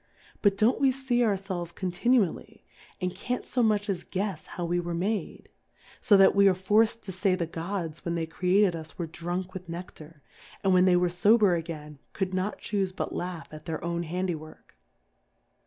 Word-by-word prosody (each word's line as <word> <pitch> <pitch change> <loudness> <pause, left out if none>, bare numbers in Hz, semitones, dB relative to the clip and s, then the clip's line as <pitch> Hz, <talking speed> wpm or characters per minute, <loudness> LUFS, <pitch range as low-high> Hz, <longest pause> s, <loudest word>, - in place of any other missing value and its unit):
But 200 -2 +3
don't 225 +6 +3
we 270 -1 +5
fee 255 -2 0
our 215 -4 +3
felves 185 -3 -4
continually, 190 +2 0 0.3
and 180 0 -2
can't 250 0 -3
fo 250 - 0
much 210 -2 +2
as 185 -4 -2
guefs 190 -3 -3
how 175 - -5
we 175 +1 0
were 175 -1 -3
made? 200 +5 -2 0.5
So 210 -5 +6
that 195 - +6
we 200 0 +5
are 190 - +4
forc'd 215 +5 +2
to 190 - -6
fay 185 +1 +1
the 175 -2 -1
Gods 165 0 -5
when 170 0 -2
they 165 -1 -1
created 180 +3 +2
us 160 -1 -9
were 170 - -2
drunk 175 +3 -4
with 185 -2 -8
Neciar; 165 -3 -9 0.4
and 190 -1 +3
when 180 0 +5
they 185 -1 +5
were 180 0 +3
fober 200 +2 +4
again, 155 -3 -6
could 190 -1 -2
not 185 +3 -1
chufe 195 -3 -2
but - - -3
laugh 175 -2 -4
at 155 0 -10
their 160 -2 -4
own 170 0 -1
Handy 180 +2 -2
work. 155 0 -11
185 Hz, 190 wpm, -28 LUFS, 170-205 Hz, 0.5 s, So